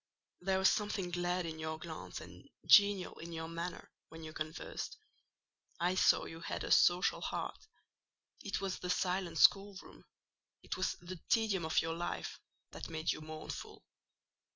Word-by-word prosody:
There 190 +1 +1
was 190 0 +5
something 205 -4 -1
glad 175 0 0
in 160 -1 -5
your 160 0 -3
glance, 160 -1 -7
and - - -13 0.2
genial 200 -3 +6
in 170 +1 -7
your 160 0 -4
manner, 170 +2 -5 0.2
when 160 0 -10
you 155 0 -7
conversed: 155 +1 -5 0.8
I 175 +1 +2
saw 185 - +4
you 165 - -8
had 165 - -4
a - - -4
social 180 +1 +5
heart; - - -4 0.8
it 200 - -2
was 195 -1 -2
the 180 - -5
silent 180 -2 0
schoolroom—it 195 +3 0
was 185 - 0
the 175 0 -7
tedium 215 -7 +2
of 160 - +2
your 165 0 -1
life—that 175 +1 -6
made 160 0 0
you - - -4
mournful. 155 0 -7
175 Hz, 150 wpm, -35 LUFS, 160-190 Hz, 0.8 s, genial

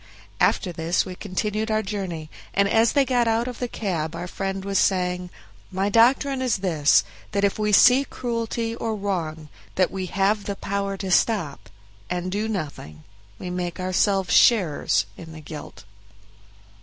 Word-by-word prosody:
After 185 - +2
this 165 +1 0
we 185 - -6
continued 210 +3 -3
our 215 0 +1
journey, 185 -6 -5 0.2
and 200 0 +3
as 225 +2 +3
they 280 -2 +4
got 245 -2 +1
out 225 +2 +1
of 250 -2 -6
the 245 - -2
cab 170 -9 -3
our 170 +1 -5
friend 195 +1 -4
was 195 -1 +1
saying, 180 -1 0 0.4
"My 190 +2 0
doctrine 260 +5 +3
is 250 -4 +1
this, 155 -5 +4 0.3
that 200 0 0
if 200 +1 +1
we 210 0 +1
see 250 +6 +7
cruelty 230 -2 -3
or 225 -1 -3
wrong 165 -6 -3 0.3
that 185 -1 +2
we 190 -1 -4
have 200 +2 +1
the 200 - -3
power 200 0 -3
to 190 -1 -4
stop, 175 - +1 0.4
and 180 +1 -3
do 210 +3 -1
nothing, 145 - -5 0.3
we 180 - -6
make 180 -1 -4
ourselves 185 +1 +1
sharers 185 -11 +4
in 165 -2 -10
the 160 - -9
guilt." 155 0 -10
195 Hz, 165 wpm, -24 LUFS, 180-220 Hz, 0.4 s, see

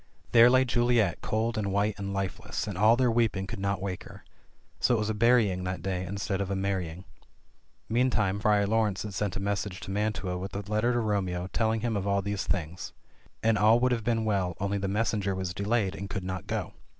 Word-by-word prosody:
There 120 0 +8
lay 130 +1 +4
Juliet 120 -6 +2
cold 110 +1 -1
and 100 -2 -1
white 100 +2 +1
and 100 0 -4
lifeless, 95 -1 -3
and - - -5
all 110 +5 +5
their 125 -2 +3
weeping 115 -5 +1
could 95 - -6
not 100 -1 -1
wake 95 -2 -4
her. - - -12 0.6
So 125 - +3
it - - +1
was 110 0 0
a - - -1
burying 110 -4 +3
that 90 0 -4
day 95 -1 -2
instead 100 0 -2
of 100 - -2
a 100 - -1
marrying. 95 -2 -3 0.8
Meantime 110 -4 +1
Friar 105 -1 +3
Laurence 105 -2 +1
had 105 -2 -6
sent 100 -1 -2
a - - -3
mes 100 0 -1
senger 95 -2 -7
to 95 - -7
Mantua 100 -3 -1
with 95 +2 -6
a 100 - -3
letter 110 +3 +2
to 120 - +1
Romeo 95 -5 -1
telling 110 -1 +1
him 115 -1 -1
of 100 -1 -2
all 100 -1 +1
these 100 0 -3
things; 90 0 -3 0.5
and 110 -2 +3
all 110 +3 +5
would 125 +1 +2
have 115 -2 0
been 115 0 0
well, 95 -5 0
only 100 +1 -1
the 100 - -2
messenger 100 -1 0
was 95 -2 -3
de 100 - -4
layed, 105 -3 +1
and 100 0 -6
could 95 - -4
not 95 0 -5
go. - - -3
100 Hz, 225 wpm, -28 LUFS, 95-110 Hz, 0.8 s, There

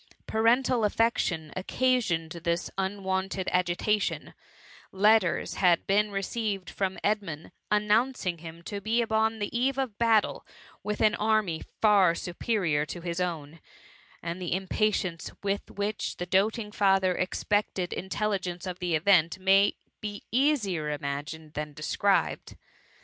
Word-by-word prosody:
Parental 235 +2 +2
affection 200 -8 0
occasioned 185 -6 0
this 170 +1 -2
unwonted 190 -1 -2
agitation; 180 +4 0 0.6
letters 205 -2 +3
had 175 -3 +3
been 210 +2 +2
received 195 -2 -3
from 190 +1 -2
Edmundy 195 -8 -2 0.2
annoimcing 210 -3 +1
him 165 +1 -10
to 200 +2 -5
be 230 +4 +1
upon 220 0 +1
the 205 +1 -4
eve 260 +3 +1
of 255 -6 -3
battle 225 -3 +2 0.4
with 210 0 -3
an 215 -1 +5
army 210 -7 +1 0.2
far 195 -5 +5
superior 175 -4 -1
to 170 +3 -7
his 170 +1 -3
own, 165 -3 -4 0.6
and 170 +2 -4
the 175 -1 -1
impatience 190 -2 -1
with 200 0 -2
which 205 +1 -3
the 180 - -3
doat 195 +5 +2
ing 210 -2 -6
father 195 -3 +3
expected 185 0 -1
intelligence 190 -2 -2
of 180 -1 -5
the 175 -2 0
event, 170 0 +3
may 195 +1 +4 0.3
be 205 -1 -6
easier 220 - +1
imagined 150 +2 -5
than 150 -1 -4
described. 195 +7 0
195 Hz, 130 wpm, -28 LUFS, 175-215 Hz, 0.6 s, an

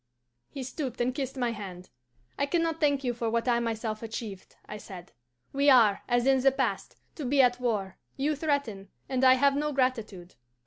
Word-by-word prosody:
He 270 - -6
stooped 260 -1 -5
and 245 +1 0
kissed 270 0 -4
my 245 -2 0
hand. 190 -5 -8 0.5
'I 280 - +1
can 335 +3 +1
not 325 -1 -2
thank 285 -2 +2
you 245 -2 0
for 230 -1 -2
what 230 +2 -1
I 240 -1 +3
myself 225 -2 -3
achieved,' 220 -4 -7
I 210 - -7
said. 185 -3 -11 0.4
'We 280 +1 +3
are, 225 -7 +5
as 245 0 +2
in 270 0 +4
the 270 +1 +4
past, 270 - -2 0.2
to 305 - -7
be 275 +2 +1
at 245 -1 +4
war, 205 -6 -2 0.2
you 295 +3 0
threaten, 275 -10 -2 0.2
and 260 -1 -1
I 260 0 +7
have 275 +1 +3
no 300 +1 -1
gratitude. 225 -9 -2
250 Hz, 195 wpm, -28 LUFS, 220-275 Hz, 0.5 s, I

